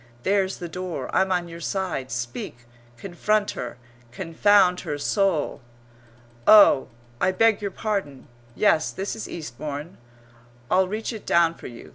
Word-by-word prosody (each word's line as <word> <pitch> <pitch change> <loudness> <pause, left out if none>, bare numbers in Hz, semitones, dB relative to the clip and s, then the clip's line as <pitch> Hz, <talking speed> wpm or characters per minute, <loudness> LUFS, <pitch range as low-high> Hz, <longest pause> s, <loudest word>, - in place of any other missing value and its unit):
There's 195 -1 +1
the 175 - -6
door! 170 -5 -5
I'm 190 0 +2
on 175 -1 0
your 170 0 -9
side. 170 -7 -3
Speak! 120 0 -6 0.3
Confront 205 - 0
her, 125 -1 -6 0.3
confound 180 +5 +3
her 145 - -4
soul! 170 -3 0 0.9
"Oh, 205 -10 +7 0.3
I 185 - +3
beg 225 +2 +3
your 200 - -2
pardon! 190 - -4 0.3
Yes, 160 -7 +3
this 195 +1 -4
is 220 - -7
Eastbourne. 150 +2 -7 0.7
I'll 185 0 +4
reach 215 +5 -4
it 220 - -8
down 170 -1 +4
for - - -10
you. 120 -1 -11
180 Hz, 140 wpm, -24 LUFS, 150-200 Hz, 0.9 s, Oh